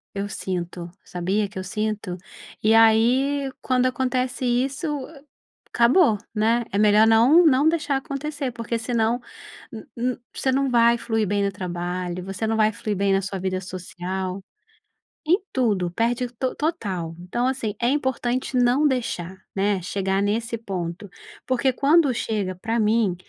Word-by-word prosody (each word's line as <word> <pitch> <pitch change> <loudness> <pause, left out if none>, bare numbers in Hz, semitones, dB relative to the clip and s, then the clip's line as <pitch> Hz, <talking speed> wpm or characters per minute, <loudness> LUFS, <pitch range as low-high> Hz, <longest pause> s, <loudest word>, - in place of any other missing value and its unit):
Eu 200 +1 -2
sinto, 175 -3 -4
sabia 190 +4 -1
que 195 -1 -8
eu - - -4
sinto? 210 -2 -3 0.5
E 215 +1 +4
aí 250 +5 +4
quando 255 -1 +1
acontece 255 0 -1
isso 265 +6 0 0.8
acabou, 240 - +4 0.2
né, 230 +2 +1
é 200 - 0
melhor 210 +1 +5
não 240 +10 +6
não 290 0 +5
deixar 300 -4 0
acontecer 280 -1 -4
porque 230 0 -3
senão 230 0 0 0.5
n 225 - -9
n 245 +1 -1 0.2
você 265 - 0
não 270 +1 +1
vai 235 -1 +4
fluir 225 -2 -1
bem 200 +1 0
no 200 - 0
trabalho, 180 0 -4
você 195 +3 -3
não 225 0 0
vai 215 0 +4
fluir 205 0 -3
bem 195 0 +2
na 195 - +2
sua 195 0 -4
vida 185 0 -2
social, 185 +1 -5 0.8
em 350 +6 +4
tudo 210 -9 +1
perde 240 +6 0
to 260 0 -1
total. 195 - -3
Então, 235 +8 -2
assim, 255 -5 -2
é 240 - +3
importante 260 -2 -1
não 250 +4 +4
deixar, 210 -9 -2 0.2
né, 195 -1 +1
chegar 195 +2 -1
nesse 225 +3 -1
ponto, 190 -2 -5 0.4
porque 260 +1 +1
quando 285 +1 +4
chega 210 -5 -2
pra 225 +6 -2
mim, 215 -3 +2
225 Hz, 150 wpm, -23 LUFS, 195-255 Hz, 0.8 s, não